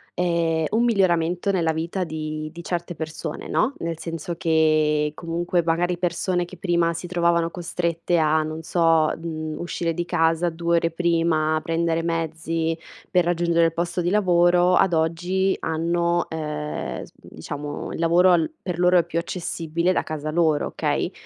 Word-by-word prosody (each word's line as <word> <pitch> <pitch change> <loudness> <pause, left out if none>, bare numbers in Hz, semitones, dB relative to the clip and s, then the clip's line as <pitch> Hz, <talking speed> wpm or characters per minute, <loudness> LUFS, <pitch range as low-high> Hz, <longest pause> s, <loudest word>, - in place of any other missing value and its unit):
ehm, 170 -2 +1
un 225 +2 +2
miglioramento 180 -4 +2
nella 165 -4 +1
vita 165 +4 -2
di 155 -1 -5
di 170 +1 -9
certe 175 0 -3
persone, 160 0 -6
no, 255 +6 +1
nel 165 -1 -3
senso 165 +1 -5
che 155 -3 +2
comunque 170 +1 -1
magari 175 +2 0
persone 175 +1 -1
che 180 +1 -12
prima 170 -1 +1
si 170 +2 -6
trovavano 170 -1 +1
costrette 170 0 -1
a 155 0 +3
non 155 +1 -5
so 165 -2 +3
mhmm, 155 -2 -5
uscire 170 -1 -2
di 175 - -2
casa 165 0 +1
2 170 +1 0
ore 165 0 +1
prima, 165 -2 +1
prendere 165 0 0
mezzi 165 0 -2 0.3
per 180 -1 +4
raggiungere 170 -1 +2
il 165 - +1
posto 170 +1 -2
di 175 - 0
lavoro, 180 -2 +4
ad 190 -1 +3
oggi 175 +4 +1
hanno 170 +1 0
ehm 150 -1 -4 0.2
s - - -14
diciamo 145 - -7
il - - -6
lavoro 170 +2 +4
al 170 -2 +3
per 180 -3 -4
loro 180 0 +5
è - - +2
più 165 0 -5
accessibile 170 0 -2
da - - 0
casa 155 -1 -4
loro, 160 -2 +2
okay, - - -1
170 Hz, 160 wpm, -23 LUFS, 160-175 Hz, 0.3 s, loro